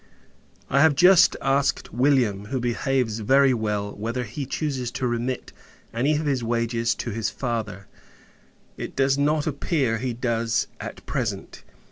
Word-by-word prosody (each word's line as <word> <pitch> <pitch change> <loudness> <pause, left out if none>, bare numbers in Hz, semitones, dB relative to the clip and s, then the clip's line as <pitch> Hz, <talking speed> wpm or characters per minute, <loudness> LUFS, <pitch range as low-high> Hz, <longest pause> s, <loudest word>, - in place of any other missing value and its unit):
I 140 - +3
have 160 -1 +5
just 180 +4 +6
asked 135 +1 0
William, 120 -6 +2
who 130 +5 -3
behaves 120 -1 -1
very 135 +4 +4
well, 105 -3 -2
whether 115 +4 -3
he 135 +2 -6
chooses 135 -4 -2
to 130 - -2
remit 120 +1 -2 0.4
any 135 +7 +1
of 155 +1 -2
his 135 -4 0
wages 115 0 0
to 120 - -4
his 110 +1 -2
father. 110 -6 -4 0.9
It - - -6
does 135 0 +2
not 150 +1 +1
appear, 140 -5 0
he 125 0 -2
does, 115 -1 0
at - - -8
present. - - -4
125 Hz, 145 wpm, -24 LUFS, 115-140 Hz, 0.9 s, just